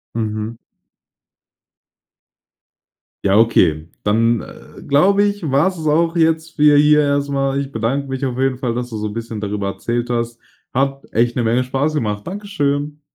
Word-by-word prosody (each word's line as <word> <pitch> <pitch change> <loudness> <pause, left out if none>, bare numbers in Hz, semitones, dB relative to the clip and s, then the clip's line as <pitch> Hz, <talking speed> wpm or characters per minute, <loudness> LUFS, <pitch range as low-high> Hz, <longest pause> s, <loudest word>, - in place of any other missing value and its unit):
Mhm. 110 0 -3 2.7
Ja, 100 +1 +4
okay. 80 -9 +3 0.2
Dann, 115 +2 +2
äh, - - -13
glaube 195 +8 +4
ich, 205 -1 -1
war 140 +6 +3
's 185 - -8
es 160 - -6
auch 165 +2 +2
jetzt 160 0 +1
für 150 -1 +5
hier 150 +1 +5
erstmal. 140 -1 0
Ich 140 0 -4
bedanke 130 +5 -1
mich 135 0 -3
auf 125 -2 -2
jeden 135 -1 +1
Fall, 125 -3 -2
dass 125 0 -4
du 110 - -5
so 105 - -3
'n - - -8
bisschen 115 -1 -5
darüber 100 -1 -3
erzählt 120 +4 -3
hast. 120 0 -2 0.3
Hat 135 +1 -1
echt 120 +1 +1
'ne 125 - 0
Menge 115 +3 +2
Spaß 135 +4 -1
gemacht. 105 -8 -2
Dankeschön. 150 -7 -2
135 Hz, 165 wpm, -19 LUFS, 115-150 Hz, 2.7 s, für